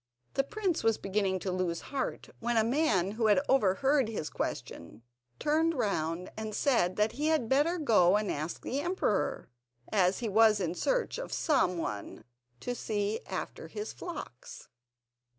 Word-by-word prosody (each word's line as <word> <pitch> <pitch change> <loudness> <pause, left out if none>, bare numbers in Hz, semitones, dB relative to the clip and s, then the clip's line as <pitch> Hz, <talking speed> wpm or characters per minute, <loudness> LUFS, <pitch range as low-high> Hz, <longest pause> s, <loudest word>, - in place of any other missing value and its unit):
The 275 - +2
prince 380 +2 -2
was 225 -1 +3
beginning 195 -1 0
to 190 - -2
lose 180 -2 -1
heart, 270 - -3
when 235 0 0
a 220 - +5
man 225 - +2
who 220 +1 0
had 210 +4 +5
overheard 265 +3 +3
his 160 -9 -4
question 85 +7 -5 0.3
turned 320 +2 +2
round 180 - -1
and 220 -1 -5
said 210 -11 +2
that 210 +2 +2
he 300 +4 -2
had 315 -7 +2
better 295 +8 +2
go 210 - +4
and 210 -1 -1
ask 155 +3 -4
the 270 - -2
emperor, 290 - -1 0.4
as 190 -2 +3
he 240 - -3
was 215 0 +5
in 175 -3 -1
search - - 0
of - - -6
some 185 - +2
one 105 -9 -5 0.4
to 245 - -2
see 210 -2 -2
after - - -5
his 420 +1 -6
flocks. 310 - -8
220 Hz, 160 wpm, -30 LUFS, 185-280 Hz, 0.4 s, a